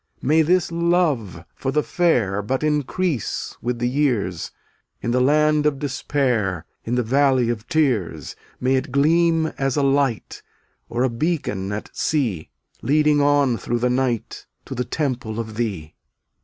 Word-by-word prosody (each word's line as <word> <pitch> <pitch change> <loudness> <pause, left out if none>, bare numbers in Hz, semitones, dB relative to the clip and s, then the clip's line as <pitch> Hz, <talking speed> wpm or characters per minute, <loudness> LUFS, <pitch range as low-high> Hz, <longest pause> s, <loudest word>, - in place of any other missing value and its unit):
248 150 +4 +2
May 160 - +6
this 180 -2 -2
love 170 - 0
for 135 - -3
the 150 +1 +1
fair 115 - +1
But 130 +7 -2
increase 150 - -1
with 120 +1 -2
the 120 +1 0
years; 120 - 0 0.5
In 120 - -2
the 125 +1 +2
land 150 +2 +3
of 145 -2 0
Despair, 125 - -1 0.2
In 120 - -2
the 125 - +1
valley 130 0 +2
of 115 0 -6
Tears, 105 - 0 0.2
May 130 +1 +2
it 130 - -3
gleam 160 +3 +2
as 135 0 0
a 145 - +2
light, 135 -4 0 0.5
Or 120 +2 0
a 130 - +2
beacon 115 - -2
at 105 +1 -5
sea, 115 - -1 0.3
Leading 150 +2 +3
on 140 -4 +3
through 120 - -2
the 125 +1 +1
night 125 -3 -2 0.2
To - - -6
the 125 - -2
temple 125 -6 -2
of 110 -1 -5
Thee. 100 -10 -3
130 Hz, 155 wpm, -22 LUFS, 115-150 Hz, 0.5 s, May